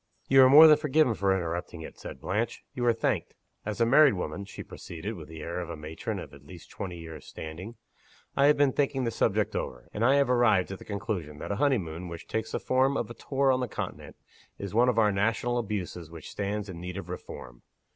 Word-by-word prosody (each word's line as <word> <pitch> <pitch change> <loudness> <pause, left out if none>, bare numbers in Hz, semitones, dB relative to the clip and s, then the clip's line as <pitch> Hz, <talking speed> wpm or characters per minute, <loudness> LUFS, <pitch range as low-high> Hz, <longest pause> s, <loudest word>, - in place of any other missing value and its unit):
"You 135 0 +7
are 130 - +8
more 150 +4 +10
than 155 -1 +8
forgiven 150 -4 +3
for 100 -2 +1
interrupting 85 -2 -2
it," - - -11
said - - -8
Blanche 105 +5 -2
"you 125 - -3
are - - +6
thanked. 115 - -1 0.3
As 105 -1 -3
a 115 - +4
married 140 +1 +6
woman," 90 +2 -4
she 100 - -9
proceeded, 90 +6 -7
with 80 -7 -9
the 80 -1 -9
air 85 +2 -4
of 85 -1 -5
a 85 - -4
matron 75 +1 -5
of - - -8
at 70 0 -14
least 85 +4 -13
twenty 90 -3 -6
years' 80 -1 -10
standing, 85 +9 -8 0.6
"I 140 0 +5
have 150 - +5
been 140 -2 +4
thinking 140 -2 0
the 115 - 0
subject - - 0
over; - - -5
and 105 - -2
I 130 +4 +5
have 140 -1 +3
arrived 110 -7 +3
at 95 - -6
the - - -12
conclusion 100 -7 -4
that - - -5
a 100 - -1
honey 140 -3 +4
moon 85 -1 -6
which 85 -1 -8
takes 110 0 -3
the - - 0
form 130 +2 +2
of 120 - -3
a - - -5
tour 135 +2 +1
on 130 - +2
the 125 - -1
Continent, - - -6 0.4
is 100 -1 -6
one 120 +3 +4
of 120 - 0
our 105 -2 +4
national 115 +4 0
abuses 95 -7 -4
which 80 -2 -10
stands 105 +1 -3
in 85 -3 -8
need 90 +1 -6
of 95 -3 -6
reform. 60 -8 -9
105 Hz, 235 wpm, -28 LUFS, 85-125 Hz, 0.6 s, more